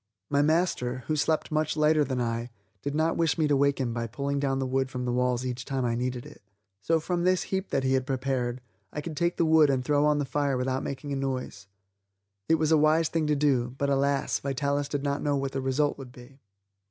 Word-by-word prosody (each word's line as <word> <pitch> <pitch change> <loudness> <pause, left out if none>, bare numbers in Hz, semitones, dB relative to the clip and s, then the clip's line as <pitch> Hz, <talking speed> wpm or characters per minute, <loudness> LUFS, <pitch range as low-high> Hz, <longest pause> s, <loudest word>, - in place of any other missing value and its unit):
My 140 0 +3
master, 145 -6 0
who 155 - 0
slept 155 +2 0
much 155 0 0
lighter 155 0 +4
than 130 -3 -2
I, 115 0 -2 0.3
did 145 0 -3
not 160 +2 +1
wish 165 -4 +1
me 155 -2 +2
to 145 - +3
wake 140 0 +2
him 120 -3 -1
by 115 0 -3
pulling 140 +5 -2
down 135 -1 0
the 135 - -1
wood 130 0 0
from 125 -1 -4
the 125 - -1
walls 125 0 0
each 125 0 -3
time 130 -1 -2
I 120 - 0
needed 125 +1 -3
it. - - -13 0.4
So 165 0 +2
from 175 +2 -2
this 185 0 +2
heap 190 0 -1
that 135 - 0
he 130 0 +2
had 130 -1 0
prepared, 130 -2 -1 0.3
I - - -5
could 160 +1 -6
take 170 +2 0
the 170 - +2
wood 160 -2 +5
and 130 -2 0
throw 145 +1 +2
on 150 -1 +3
the 145 - 0
fire 140 0 0
without 130 +1 -1
making 140 +1 -5
a - - -1
noise. 130 -7 -4 0.8
It 160 - +6
was 155 0 0
a 160 - +6
wise 155 +1 +3
thing 160 -2 0
to 150 - +2
do, 130 -4 +1
but 140 0 0
alas, 140 0 +1
Vitalis 140 +1 -1
did 145 -2 -2
not 140 0 -1
know 145 -1 +1
what 135 -1 -2
the 135 - -3
result 140 +3 0
would 130 -2 -9
be. 125 +2 -15
140 Hz, 240 wpm, -27 LUFS, 130-150 Hz, 0.8 s, It